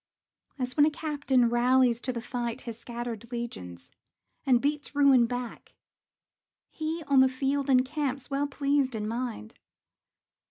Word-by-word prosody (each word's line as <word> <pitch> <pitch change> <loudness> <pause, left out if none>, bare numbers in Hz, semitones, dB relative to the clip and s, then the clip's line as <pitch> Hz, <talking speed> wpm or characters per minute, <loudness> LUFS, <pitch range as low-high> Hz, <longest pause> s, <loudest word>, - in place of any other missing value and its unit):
As 250 -2 -3
when 295 0 +5
a - - +4
captain 290 -5 +1
rallies 245 0 +3
to 255 - -2
the 235 -2 -5
fight 245 0 -4
His 230 -2 -7
scattered 235 -1 -6
legions, 160 - -7 0.6
and 250 -2 +5
beats 290 +2 -2
ruin 275 -4 +5
back, 245 -1 -6 1.0
He, 320 +1 -4
on 280 -2 +3
the 260 0 +6
field, 275 +2 -1
encamps, 270 +1 +1
well 280 +1 -1
pleased 280 -2 0
in 210 -1 -3
mind. 230 - -4
255 Hz, 135 wpm, -28 LUFS, 240-280 Hz, 1.0 s, the